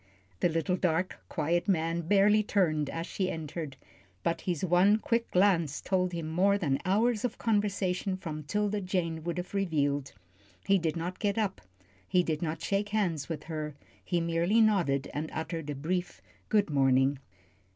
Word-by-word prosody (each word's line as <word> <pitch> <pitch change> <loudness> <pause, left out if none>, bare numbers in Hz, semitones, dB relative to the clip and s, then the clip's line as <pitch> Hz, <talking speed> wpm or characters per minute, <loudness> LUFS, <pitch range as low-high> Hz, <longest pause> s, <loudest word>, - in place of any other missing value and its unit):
The - - +3
little, 165 +2 0
dark, 180 +1 0
quiet 170 +3 0
man 165 -2 +1
barely 205 +5 +4
turned 155 -8 +1
as 165 0 -4
she 190 0 -2
entered, 155 -4 -5 0.5
but 170 - 0
his 180 -1 -1
one 185 +4 +5
quick 230 +1 -1
glance 175 -6 +2
told 185 -1 0
him 165 -2 -4
more 190 +5 +3
than 140 -8 0
hours 215 +4 +2
of 245 -2 -2
conversation 200 -3 0
from 155 -5 -5
'Tilda 205 +6 -1
Jane 170 -4 -2
would 170 +1 -3
have 180 +2 -5
revealed. 145 -8 0 0.5
He 195 -1 +4
did 165 -2 -1
not 175 +2 -4
get 205 0 0
up, 205 -4 -1 0.5
he 180 - +3
did 155 -3 -2
not 160 -2 -3
shake 200 +1 0
hands 175 -9 -1
with 160 - -4
her, 155 -2 -5 0.3
he 175 - 0
merely 170 +6 +2
nodded 175 -11 +3
and 155 +2 -3
uttered 160 -1 -4
a 145 - -2
brief 175 +5 -2 0.3
"Good 205 -6 +2
morning." 135 0 +3
175 Hz, 165 wpm, -30 LUFS, 160-195 Hz, 0.5 s, one